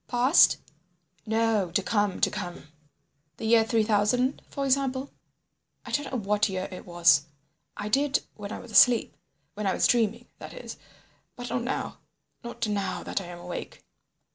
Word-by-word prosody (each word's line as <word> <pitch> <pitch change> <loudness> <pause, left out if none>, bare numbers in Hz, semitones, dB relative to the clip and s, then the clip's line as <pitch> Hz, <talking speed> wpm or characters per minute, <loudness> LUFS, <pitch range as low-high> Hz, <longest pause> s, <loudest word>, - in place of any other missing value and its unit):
"Past?" 250 +6 +5 0.7
"No, 220 -4 +1
to 190 +4 0
come—to 205 -3 +1
come." 175 -3 -7 0.7
"The - - -6
year 225 0 +5
three 225 0 +1
thousand, 225 +5 +1
for 280 - -3
example?" 270 0 0 0.7
"I - - -8
don't 290 -2 -2
know 260 - -1
what 205 -1 +1
year 185 0 -3
it 185 - -9
was. 165 -4 +4 0.5
I 205 - -4
did 280 +6 +1
when 205 -1 -8
I - - -4
was 240 - -11
asleep, 220 +3 +5 0.4
when 210 +1 -3
I 190 - +1
was - - +2
dreaming, 235 0 +1
that - - -9
is, - - -8 0.6
but 245 0 -7
not 250 - -1
now—not 235 -1 -6
now 205 -2 -2
that - - -2
I - - -9
am 175 0 -9
awake. 175 0 -8
220 Hz, 160 wpm, -27 LUFS, 195-245 Hz, 0.7 s, Past